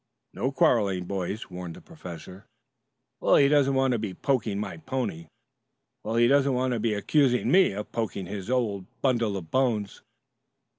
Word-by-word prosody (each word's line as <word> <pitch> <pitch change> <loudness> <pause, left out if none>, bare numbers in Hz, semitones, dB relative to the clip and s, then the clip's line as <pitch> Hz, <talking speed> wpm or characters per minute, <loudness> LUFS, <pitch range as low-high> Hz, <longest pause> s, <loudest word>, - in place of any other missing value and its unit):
"No 130 - -1
quarreling, 100 -9 +2
boys," 100 +2 -4
warned 90 -2 -7
the - - -11
professor. 95 - -11 0.7
"Well, - - +4
he 140 - +6
doesn't 140 -2 +3
want 135 -1 +2
to 120 - 0
be 105 -4 -4
poking 115 -7 0
my 105 - -5
pony!" 130 - -4 0.8
"Well, 110 +2 -3
he 120 0 +5
doesn't 140 0 +3
want 130 0 0
to 120 - -1
be 110 -1 0
accusing 125 +3 +2
me 185 - +5
of 105 +1 -6
poking 110 -4 -3
his 100 +2 -6
old 105 -7 -1 0.2
bundle 115 -6 +1
of 80 -4 -9
bones." 115 -7 0
115 Hz, 165 wpm, -26 LUFS, 100-130 Hz, 0.8 s, he